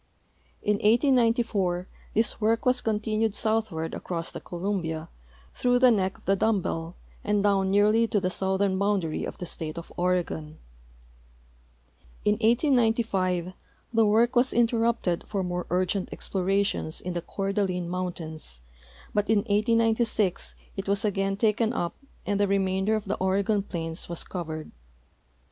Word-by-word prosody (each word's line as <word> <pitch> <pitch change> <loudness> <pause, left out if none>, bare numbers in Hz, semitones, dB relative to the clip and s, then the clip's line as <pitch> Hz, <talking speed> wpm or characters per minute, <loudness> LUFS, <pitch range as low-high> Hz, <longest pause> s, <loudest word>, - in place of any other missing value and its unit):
In 210 0 +2
1894 225 -6 +2 0.3
this 225 +1 +1
work 225 +2 +2
^tas 250 0 +2
con 215 -2 +1
tinued 215 -1 0
southward 215 -8 0
across 170 -2 -4
the - - -6
Columbia 170 -3 -3 0.4
through 245 0 +2
the 250 0 +6
neck 190 -3 0
of - - -24
the 195 - +3
dumb 220 +1 +2
bell 165 -1 -4 0.3
and 205 -1 +1
down 195 -2 +2
nearly 210 +3 +4
to 210 - +1
the 185 -1 -1
southern 190 0 0
boundary 195 -6 0
of - - -7
the 180 - -5
state 160 -1 -2
of 170 - -8
Oregon. 175 -4 -1 1.7
In 210 - +5
1895 225 - +2 0.4
the 225 -1 +4
work 230 +3 +3
was 245 +2 +3
interrupted 230 -6 +1
for 195 -3 -2
more 180 0 -3
urgent 185 +1 0
exi)lorations 195 -3 0
in 180 - -4
the 175 - -2
Coeur 195 +3 -3
d'Alene 185 -4 -1
mountains, 165 - -4 0.5
but 210 0 0
in 215 -2 +4
1896 220 -2 +1 0.2
it 195 - -4
was 200 +1 +1
again 195 -1 0
taken 220 +2 +2
up 175 -7 -2 0.3
and 205 -1 0
the 205 - +3
remainder 190 +1 +1
of 215 - -3
the 200 - -2
Oregon 200 +2 +1
plains 165 -4 -5
was 170 - -1
covered. 155 -4 -6
200 Hz, 145 wpm, -27 LUFS, 180-220 Hz, 1.7 s, the